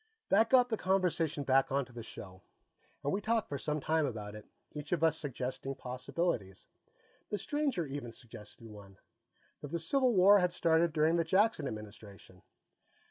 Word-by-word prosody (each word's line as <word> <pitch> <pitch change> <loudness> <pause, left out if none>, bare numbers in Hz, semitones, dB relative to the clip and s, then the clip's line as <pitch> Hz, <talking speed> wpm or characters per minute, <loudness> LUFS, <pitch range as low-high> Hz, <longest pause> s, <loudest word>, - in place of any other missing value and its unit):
That 220 +3 +4
got 250 -1 +5
the 220 - -1
conversation 175 -6 0
back 135 0 +3
onto 135 -2 -1
the 120 - -7
show, 95 -4 -10 0.6
and 145 - 0
we 200 - -1
talked 225 +1 0
for 140 - -4
some 150 +2 -2
time 155 +1 +1
about 105 -4 -6
it, 105 0 -11 0.2
each 150 -1 -8
of 170 -2 0
us 160 -1 +4
suggesting 135 -1 -4
possibilities. 125 - -3 0.6
The 205 - -1
stranger 275 - -1
even 135 -4 -6
suggested 115 -1 -12
one 100 -3 -13 0.6
that - - -6
the 170 - -2
Civil 250 - +1
War 200 +2 +7
had 180 -1 +1
started 165 -1 +2
during 155 +2 +2
the 165 - +2
Jackson 190 -2 +2
Administration. 105 -4 -10
150 Hz, 165 wpm, -32 LUFS, 120-180 Hz, 0.6 s, War